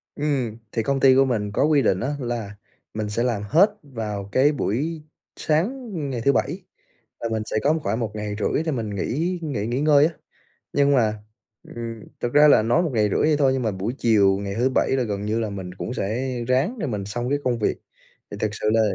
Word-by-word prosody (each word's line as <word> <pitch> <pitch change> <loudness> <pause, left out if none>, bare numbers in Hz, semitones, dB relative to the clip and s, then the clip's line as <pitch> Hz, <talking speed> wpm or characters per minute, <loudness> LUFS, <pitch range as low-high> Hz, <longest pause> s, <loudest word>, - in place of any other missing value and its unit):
Ừm, 135 -7 -1
thì 115 - -1
công 135 +4 0
ty 130 -1 +6
của 135 - +5
mình 105 -5 -1
có 100 - +1
quy 150 -1 +4
định 95 -7 +2
á 140 +6 -2
là 120 -5 -4 0.4
mình 105 -1 -3
sẽ 115 +3 -1
làm 120 -5 0
hết 165 - +4
vào 105 -7 -5
cái 135 +7 +4
buổi 150 +5 -2 0.3
sáng 225 - -1 0.2
ngày 120 -3 -3
thứ 140 - +4
Bảy, - - -1 0.6
là 115 - -3
mình 110 -1 -1
sẽ - - -2
có 150 - +4
khoảng 110 +4 -1
1 115 -3 -2
ngày 105 -1 -4
rưỡi 150 - 0
thì 160 - 0
mình 115 -5 -3
nghỉ 170 - -1
nghỉ 135 -10 -3
nghỉ 125 +4 -1
ngơi 150 -1 +5
á. 165 - -1 0.6
Nhưng 140 0 +3
mà, 110 -3 +2 0.6
ừm, 115 -2 -6 0.2
thật 120 - 0
ra 150 +1 +7
là 145 - +6
nói 120 +11 +2
1 160 - -1
ngày 105 -3 +2
rưỡi - - 0
vậy 155 0 +3
thôi, 135 -2 +3
nhưng 130 - -1
mà 110 - 0
buổi 95 +5 -3
chiều 100 -4 +4
ngày 100 0 -4
thứ 125 +4 +2
Bảy - - +2
là 130 - +1
gần 105 -3 -3
như 110 +2 0
là 110 - -2
mình 95 -3 -6
cũng 115 - -5
sẽ 125 +4 -2
ráng 140 - +1
để 155 - -2
mình 105 -5 -3
xong 120 +4 -3
cái 145 +1 +1
công 120 -2 0
việc. - - 0 0.5
Thì 100 - -6
thật 110 - 0
sự 105 - -3
là 115 - +4
120 Hz, 235 wpm, -23 LUFS, 105-145 Hz, 0.6 s, ra